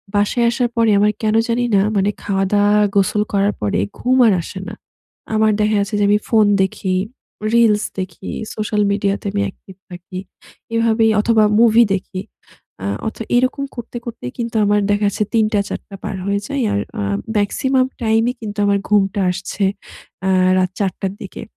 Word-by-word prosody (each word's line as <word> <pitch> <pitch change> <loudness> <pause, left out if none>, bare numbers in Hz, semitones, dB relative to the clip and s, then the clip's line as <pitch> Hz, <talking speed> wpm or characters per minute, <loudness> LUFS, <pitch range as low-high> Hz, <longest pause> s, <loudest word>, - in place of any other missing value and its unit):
বাসায় 205 +4 +2
আসার 240 0 0
পরে 230 -2 +3
আমার 210 +1 +4
কেন 215 0 +2
জানি 240 +1 0
না 195 - +5 0.2
মানে 195 +1 +2
খাওয়া 195 -1 0
দাওয়া 205 +1 +4 0.2
গোসল 200 +1 +2
করার 200 +1 +2
পরে 105 -3 0 0.2
ঘুম 255 +1 +2
আর 215 - +4
আসে 190 +3 -8
না। - - -6 0.6
আমার 215 0 +3
দেখা 210 0 +2
গেছে 200 +1 -2
যে - - +2
আমি 210 0 +4
ফোন 220 -2 +5 0.2
দেখি, 190 0 -1 0.6
রিলস 225 -3 +4 0.2
দেখি, 185 0 -6 0.3
সোশ্যাল 210 0 -1
মিডিয়াতে 200 0 -1
আমি 200 0 -1
অ্যাকটিভ 190 -1 -10
থাকি। 180 +1 -8 0.6
এভাবেই 225 -1 +3
অথবা 220 0 +3 0.2
মুভি 235 0 +6
দেখি। 185 0 -5 0.6
আ - - -3 0.2
অথ 220 - -5 0.2
এরকম 255 +3 +1
করতে, 240 0 -7
করতেই 225 - -6
কিন্তু 230 -1 -3
আমার 205 0 +3
দেখা 205 0 +1
যাচ্ছে 200 +1 0
৩ 220 -1 +4
টা 205 - +3
৪ - - -4
টা 200 - -8
পার - - -4
হয়ে 200 0 0
যায়। 280 -2 -2
আর - - +1 0.2
আ - - -1 0.3
মেক্সিমাম 260 +6 +1 0.2
টাইম 225 0 +3
এ - - -9
কিন্তু 210 -1 -6
আমার 200 0 +2
ঘুমটা 200 -1 +2
আসছে 185 +2 -4 0.6
আ - - +2 0.3
রাত 185 -1 +2
৪ 195 -2 +1
টার 195 -1 -2
দিকে। 190 - -8
210 Hz, 180 wpm, -18 LUFS, 195-225 Hz, 0.6 s, মুভি